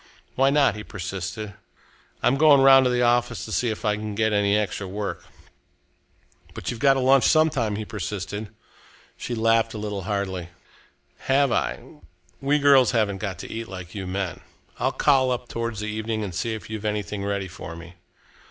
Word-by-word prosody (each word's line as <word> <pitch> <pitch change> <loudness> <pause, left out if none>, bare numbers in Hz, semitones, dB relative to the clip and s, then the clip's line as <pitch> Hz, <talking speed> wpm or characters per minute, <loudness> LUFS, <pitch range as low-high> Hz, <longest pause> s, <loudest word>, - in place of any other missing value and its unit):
"Why 135 +1 +3
not?" 140 -6 +3
he 105 - -7
persisted. 95 +2 -5 0.7
"I'm 125 - +4
going 145 -1 +6
round 135 -1 +7
to - - +3
the 125 0 +1
office 120 -4 +1
to - - -8
see 120 - +1
if 110 +1 -5
I 105 0 +1
can 105 -1 -5
get 110 0 +1
any 105 0 +3
extra 100 -1 -2
work." 100 +2 -4 1.3
"But - - -4
you've 120 - -7
got 135 +1 +5
to - - 0
lunch 130 0 +4
some 155 0 +4
time," 110 -6 -1
he 110 +1 -4
persisted. 105 +1 -5 0.7
She 120 - -5
laughed 115 0 +2
a - - -4
little 105 -2 -4
hardly. 95 -3 -3 0.8
"Have 135 0 +3
I? - - 0 0.6
We 140 +2 +2
girls 140 -4 +5
haven't 105 -4 +1
got 95 -3 -4
to - - -9
eat 115 0 -5
like 90 -2 -9
you 95 -3 -5
men. 95 -1 -3 0.4
I'll - - +1
call 135 -3 +3
up 125 -1 -2
towards 115 -2 -4
the 105 - -3
evening 110 0 -3
and 95 -4 -5
see 115 +6 -2
if 110 - -9
you've 110 -1 -6
anything 105 -2 -3
ready 100 -1 -2
for 90 -1 -9
me." 85 +1 -11
110 Hz, 190 wpm, -24 LUFS, 100-125 Hz, 1.3 s, round